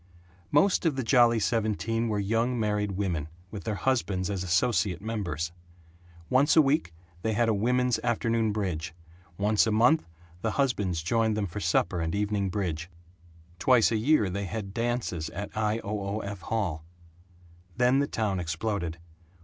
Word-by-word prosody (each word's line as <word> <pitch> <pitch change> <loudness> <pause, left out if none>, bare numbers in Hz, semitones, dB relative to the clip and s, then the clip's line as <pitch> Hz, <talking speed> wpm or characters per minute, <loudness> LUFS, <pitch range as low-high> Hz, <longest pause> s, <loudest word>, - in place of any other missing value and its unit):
Most 170 +7 +3
of 150 - +1
the 135 - -2
Jolly 120 -1 +5
Seventeen 115 +1 0
were 105 - 0
young 115 +5 0
married 105 -2 0
women, 90 -6 -2 0.2
with 100 -5 -7
their 110 - -1
husbands 100 -5 0
as 95 -2 -2
associate 95 0 +1
members. 90 -7 -3 0.8
Once 140 +4 +4
a 160 - +8
week 140 - +1 0.3
they 110 +2 0
had 115 +2 +2
a 110 - +3
women's 125 +3 +1
afternoon 115 -1 +1
bridge; 85 -6 -3 0.4
once 105 +2 +3
a - - +1
month 120 - +3 0.3
the 110 0 -1
husbands 100 - 0
joined 110 +3 +1
them 105 - 0
for 95 +2 -6
supper 85 0 +1
and 80 +3 -2
evening 100 -1 0
bridge; 90 -4 -3 0.7
twice 125 +1 +4
a - - +1
year 110 0 +3
they 100 +2 -3
had 100 0 -5
dances 115 -9 -2
at 100 +5 -7
I. 110 0 +1
O. 105 +1 -3
O. 100 +1 -3
F. 100 -1 -6
Hall. 95 -7 -2 0.9
Then 125 +2 +4
the 140 - +1
town 105 -7 -1
exploded. 85 0 -2
105 Hz, 160 wpm, -28 LUFS, 95-115 Hz, 0.9 s, a